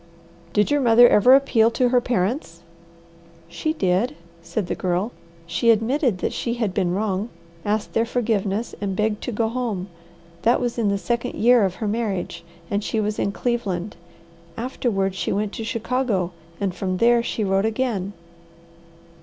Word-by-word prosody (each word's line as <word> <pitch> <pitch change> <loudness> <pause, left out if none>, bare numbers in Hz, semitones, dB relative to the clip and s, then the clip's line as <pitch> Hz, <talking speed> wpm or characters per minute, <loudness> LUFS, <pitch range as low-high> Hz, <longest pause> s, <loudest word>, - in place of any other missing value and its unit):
"Did 210 +8 +2
your 290 -1 +3
mother 240 -1 +7
ever 245 +5 +6
appeal 240 -5 +4
to 245 +1 +1
her 250 0 +3
parents?" 200 - -2 0.8
"She 170 - -2
did," 200 - +1 0.3
said 170 +4 -3
the - - -2
Girl. 185 +4 -1 0.3
"She 175 +7 +1
admitted 230 - +2
that - - -1
she 235 -1 -2
had 220 -6 -1
been 185 -3 0
wrong, 205 +1 -1 0.3
asked 210 +1 -1
their 225 +1 +1
forgiveness, 220 -3 -1
and 195 -2 -2
begged 210 +1 0
to - - -2
go 225 0 0
home. 220 -6 -3 0.5
That 235 +2 +3
was 240 -1 -2
in 215 -3 +2
the 200 - +1
second 235 +6 -2
year 240 0 +5
of 185 -1 -2
her 215 - -3
marriage, 210 -4 -2 0.2
and 205 +3 -1
she 220 - -1
was 210 0 -1
in 200 - 0
Cleveland. 205 -5 -2 0.6
Afterward 225 -6 -1
she 190 - -2
went 205 0 -1
to 225 - -5
Chicago, 230 -5 -1 0.4
from 185 +1 -3
there 235 +3 +4
she 230 -1 -2
wrote 195 +1 +1
again." 220 -4 -1
220 Hz, 160 wpm, -23 LUFS, 195-240 Hz, 0.8 s, mother